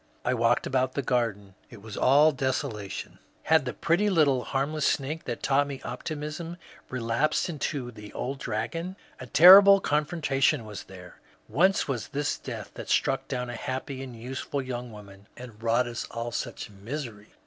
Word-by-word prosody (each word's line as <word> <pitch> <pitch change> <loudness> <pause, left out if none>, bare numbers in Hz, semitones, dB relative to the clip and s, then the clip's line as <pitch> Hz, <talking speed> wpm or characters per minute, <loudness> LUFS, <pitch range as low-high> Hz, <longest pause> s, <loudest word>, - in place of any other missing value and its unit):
I 125 - +2
walked 115 0 +2
about 130 -1 0
the 140 - -2
garden; 115 -6 -1 0.2
it 115 - -12
was 105 +1 -9
all 145 +4 +5
desolation; 130 -7 -3 0.2
had 160 -3 +3
the 125 - -3
pretty 185 +5 +2
little 145 -9 +3
harmless 140 +3 0
snake 150 +3 -1
that 120 - -5
taught 140 +1 +2
me 140 -2 -6
optimism 155 +3 -5 0.3
relapsed 125 +7 0
into 145 -5 -3
the 105 -2 -11
old 135 +2 -4
dragon? 150 - -3 0.2
A - - -8
terrible 195 +3 +9
confrontation 150 - +1
was 105 -2 -8
here 90 -1 -12
I - - -30 0.2
Whence 190 +8 +3
was 125 -6 -3
this 145 0 -2
death - - -7
that - - -8
struck - - +1
down 125 -1 -3
a - - -6
happy 130 +2 -4
and 130 -3 -8
useful 130 +4 -4
young 125 -2 -5
woman, 100 -2 -13
and 120 -4 -11
wrought 115 +2 +2
us 120 0 -5
all 115 0 -4
such 115 - -5
misery 105 0 -7
130 Hz, 170 wpm, -27 LUFS, 115-150 Hz, 0.3 s, terrible